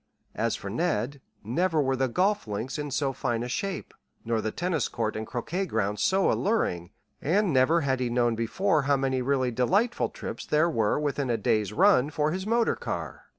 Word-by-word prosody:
As 115 +1 0
for 100 - -6
Ned 140 - -1 0.2
never 160 - +1
were 135 -2 +2
the 130 0 +1
golf 195 - +1
links 110 +7 -4
in 145 0 -3
so 135 0 -1
fine 120 -3 -2
a - - -3
shape, 195 +9 -4 0.3
nor 115 -1 0
the 110 - -1
tennis 165 +2 -1
court 115 -2 -2
and 110 0 -4
croquet 175 +11 -3
ground 105 - -1
so 190 0 +3
alluring; 90 - 0 0.3
and 185 +2 +2
never 140 +6 +4
had 135 -3 0
he 125 -1 -1
known 120 -1 +2
before 155 - +1
how 140 0 +2
many 130 -1 0
really 130 -1 +1
delightful 195 - +1
trips - - -7
there 155 +3 +2
were 110 -1 +1
within 145 -2 -1
a 115 - +1
day's 105 -1 +1
run 160 - +4
for 150 0 0
his 190 +3 -3
motor 230 +1 +2
car. - - -5
135 Hz, 195 wpm, -27 LUFS, 115-175 Hz, 0.3 s, never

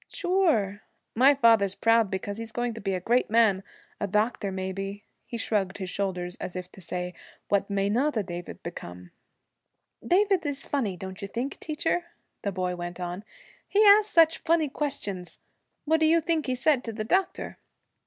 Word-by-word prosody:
'Sure. 320 - +1 0.3
My 270 +5 +6
father's 225 -7 +4
proud 230 -2 +3
because 200 +2 -4
he's 230 -1 -6
going 240 +1 -2
to 225 - -8
be 195 -1 -1
a - - -2
great 240 +7 +1
man; 220 -4 +4 0.4
a 205 - -1
doctor, 210 0 0
maybe.' 195 +2 -4 0.2
He 235 - -5
shrugged 205 -4 -1
his 190 -2 -5
shoulders, 180 -3 -2
as 180 - -6
if 180 0 -6
to 190 - -14
say, 180 +1 -4 0.4
'What 200 0 +1
may 200 0 0
not 250 +6 +1
a 215 - +1
David 175 -1 -7
become?' 90 - -8 0.9
'David 380 - +3
is 285 -2 -3
funny, 220 -10 -1
don't 190 +2 -7
you 200 - -4
think, 245 +7 -4
teacher?' 325 +3 -1 0.4
the 200 - -2
boy 180 -1 -2
went 175 0 -6
on. 180 +2 -4 0.4
'He 415 +2 +4
asks 415 +1 +7
such 325 -1 +5
funny 320 -2 +2
questions. 205 - -4 0.5
What 320 +1 +3
do 315 - +4
you 335 +1 +5
think 325 -2 0
he 255 - 0
said 255 0 +2
to 225 - -4
the 215 0 -4
doctor?' 375 - -1
215 Hz, 180 wpm, -27 LUFS, 190-290 Hz, 0.9 s, asks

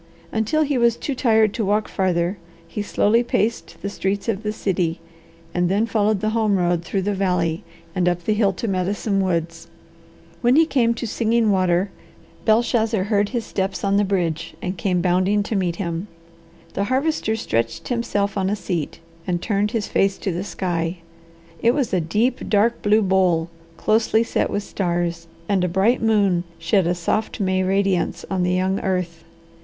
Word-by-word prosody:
Until 225 +8 +1
he 280 -3 0
was 235 -1 +4
too 280 - -3
tired 220 -4 +3
to 230 - -2
walk 210 +2 +1
farther 185 0 0 0.3
he 210 - -4
slowly 210 +2 +2
paced 230 -1 -1
the - - -1
streets 195 +1 -2
of 215 -3 -1
the 210 -1 -2
city, 180 -5 -1 0.5
and 175 0 +1
then 205 +4 +2
followed 215 -3 +1
the 215 - 0
home 220 -3 +2
road 175 -1 +1
through 190 +2 -2
the 205 +2 0
valley 180 -4 0 0.3
and 180 -2 +2
up 175 0 -2
the 215 - +1
hill 210 -2 +2
to 230 - -4
Medicine 195 +1 0
Woods. 165 -2 -2 0.7
When 245 +1 +4
he 325 +2 +6
came 235 -6 +2
to 235 - -4
Singing 225 0 +1
Water, 185 0 +2 0.5
Belshazzar 220 -2 +2
heard 205 0 +1
his 235 -3 -3
steps 190 0 -3
on 200 0 +2
the 205 - +3
bridge, 170 -4 -1
and 185 +1 -3
came 180 0 0
bounding 185 +3 +2
to 215 - -3
meet 180 -3 0
him. 170 +1 -3 0.7
The 200 - -1
Harvester 260 -2 0
stretched 115 - -2
himself 205 -5 -1
on 190 0 0
a 205 - +1
seat 180 -6 -4 0.3
and 175 -1 0
turned 205 +2 0
his 215 -1 -2
face 195 0 +1
to 195 - -2
the 175 +2 -3
sky. 175 -3 -2 0.6
It 235 +2 +3
was 275 -8 -1
a 180 - +2
deep, 215 +10 0
dark 220 +3 +2
blue 210 +1 +3
bowl, 180 -3 +2 0.3
closely 220 +1 +2
set - - -1
with 205 - -2
stars, 175 -3 -2 0.2
and 195 -3 +1
a - - +2
bright 195 +8 +2
moon 200 -6 +2
shed 170 +2 +1
a 175 - +1
soft 215 +7 -2
May 185 -2 +1
radiance 190 -1 0
on 190 -1 0
the 180 0 +1
young 185 +1 +1
earth. 180 -3 -2
195 Hz, 180 wpm, -22 LUFS, 180-220 Hz, 0.7 s, he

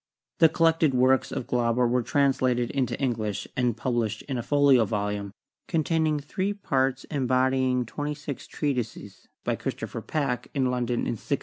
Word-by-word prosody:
The 160 - +7
collected 165 -3 +3
works 130 +1 +3
of 125 - -3
Glauber 120 0 +1
were 125 +1 +2
translated 130 -2 +1
into 130 -4 -1
English 110 -6 -2
and 125 -4 +1
published 120 -3 -1
in 135 - -4
a 120 - -1
folio 140 -1 +4
volume, 105 -1 -2 0.4
containing 160 -2 +1
three 185 +8 -2
parts 135 -9 0
embodying 130 -2 +1
twenty 145 +5 -4
six 145 -2 -7
treatises, 130 -7 -4 0.2
by - - 0
Christopher - - -5
Packe, 140 -6 -2
in 130 -2 +1
London, 125 -1 -1
in - - -1
1689. 140 - -1
130 Hz, 150 wpm, -26 LUFS, 120-145 Hz, 0.4 s, The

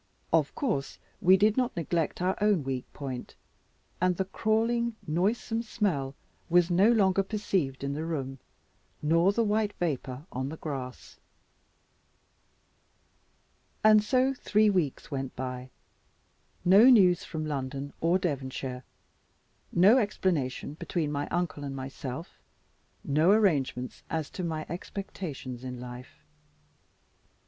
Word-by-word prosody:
Of - - +2
course 195 - -2 0.2
we 185 +2 +6
did 210 +3 +3
not 250 -6 0
neglect 170 +1 -1
our 185 +1 +1
own 205 -7 +3
weak 130 -2 -4
point; 130 -4 -6 0.7
and 180 -1 +2
the 190 - 0
crawling 230 +4 0
noisome 210 +8 0
smell 180 - -1 0.3
was 175 0 +4
no 195 +6 +5
longer 195 -4 +3
perceived 190 -10 -2
in 140 0 -2
the 155 +2 -3
room, 135 -5 -4 0.6
nor 165 +5 +4
the 230 +3 +1
white 210 -1 +1
vapour 140 -4 -3
on 130 +2 -3
the 160 - -7
grass. 135 -5 -7 2.6
And 215 -1 +7
so 255 +4 +2
three 215 -4 +2
weeks 165 -6 -1
went 135 -2 -4
by; 125 0 -5 1.0
no 195 +6 +8
news 185 -8 +6
from 155 -2 -4
London 140 -1 -4
or 170 +3 +3
Devonshire, 130 -6 -3 0.9
no 200 +9 +6
explanation 170 - -1
between 155 -1 -2
my 145 0 -2
uncle 175 -4 -2
and 140 -1 -4
myself, 135 +3 -7 0.6
no 155 +5 +3
arrangements 150 - +2
as 160 -2 -3
to 185 - -5
my 160 -2 -3
expectations 160 -8 -6
in 125 -1 -6
life. 125 +1 -10
165 Hz, 120 wpm, -29 LUFS, 135-200 Hz, 2.6 s, no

